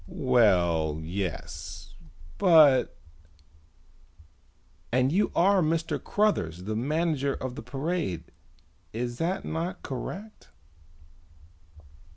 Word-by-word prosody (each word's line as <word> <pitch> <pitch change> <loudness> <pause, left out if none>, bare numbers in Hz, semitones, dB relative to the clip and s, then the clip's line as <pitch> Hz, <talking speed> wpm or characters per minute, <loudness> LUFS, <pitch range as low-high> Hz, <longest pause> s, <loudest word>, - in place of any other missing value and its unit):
"Well, 85 - +2
yes, 85 -2 -5 0.5
but 155 -9 +5 0.9
" 85 +1 -31
"And 130 +2 +2
you 200 +5 +2
are 190 +2 +4
Mr. 165 0 -1
Cruthers, 90 - 0
the 110 +1 -2
manager 145 +2 0
of 130 -1 -5
the - - -7
parade, 135 - -3 0.7
is 120 +1 -4
that 175 +3 -1
not 165 +3 -4
correct?" 195 - -7
125 Hz, 90 wpm, -27 LUFS, -, 0.9 s, but